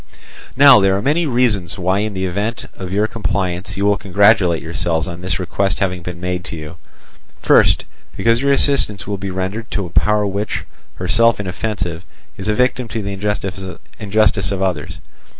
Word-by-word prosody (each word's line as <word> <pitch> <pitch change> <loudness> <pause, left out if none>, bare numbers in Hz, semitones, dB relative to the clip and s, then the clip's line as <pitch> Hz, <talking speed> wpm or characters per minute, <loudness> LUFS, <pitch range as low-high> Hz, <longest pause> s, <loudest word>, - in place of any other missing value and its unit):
"Now 140 -2 +8
there 95 -1 +3
are - - -2
many 155 +4 +1
reasons 115 -8 0
why 95 +1 +1
in 105 -1 -2
the 95 0 -2
event 100 +6 -3
of 95 -2 -7
your 105 +3 +2
compliance 95 -4 -3
you 100 - 0
will 100 0 +3
congratulate 95 -3 +3
yourselves 80 0 -1
on 85 -1 -7
this 90 +2 -2
request 95 +1 -1
having 90 -3 -1
been 85 0 -7
made 90 0 -3
to - - -6
you. 80 +1 -9 0.6
First, - - +4 0.3
because 115 +1 +2
your 140 0 +2
assistance 135 -7 +2
will 100 -1 -4
be 100 0 -4
rendered 95 +5 -4
to 100 - -2
a 85 - -9
power 105 +3 +2
which, 100 +1 -3 0.3
herself 110 +5 +2
inoffensive, 95 -3 -3 0.3
is 95 - -6
a 105 - +1
victim 125 0 +1
to 110 -1 -4
the 100 0 -4 0.9
injustice 105 -3 +1
of 95 -1 -2
others. 85 -3 -2
100 Hz, 175 wpm, -18 LUFS, 90-110 Hz, 0.9 s, Now